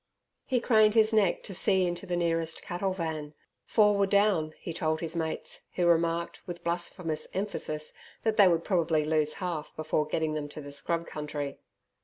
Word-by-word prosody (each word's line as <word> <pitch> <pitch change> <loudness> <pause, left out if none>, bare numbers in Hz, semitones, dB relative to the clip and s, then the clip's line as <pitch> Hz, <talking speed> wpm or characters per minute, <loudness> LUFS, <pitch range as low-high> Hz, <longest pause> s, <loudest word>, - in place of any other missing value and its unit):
He 255 -2 +2
craned 220 -2 +4
his 220 0 +5
neck 205 -5 +3
to 195 - -8
see 190 0 +3
into 175 +2 -3
the 175 - -1
nearest 165 -1 -1
cattle 185 +2 -2
van. 160 -4 -4 0.3
Four 210 -2 +4
were 200 -1 +3
down, 195 -6 +2
he 165 - -6
told 160 -1 0
his 165 0 -4
mates, 160 -1 -3
who 180 - +1
remarked, 170 0 +1
with 175 -1 -7
blasphemous 170 -2 -2
emphasis, 170 -6 -3 0.3
that 220 -1 +1
they 205 -3 +7
would 170 -2 +2
probably 165 -5 +1
lose 155 -1 +2
half 170 -5 -4
before 155 -1 0
getting 155 0 -1
them 150 -1 -3
to 150 - -9
the 145 -1 -8
scrub 165 +4 -2
country. 150 -3 -5
170 Hz, 180 wpm, -29 LUFS, 155-190 Hz, 0.3 s, they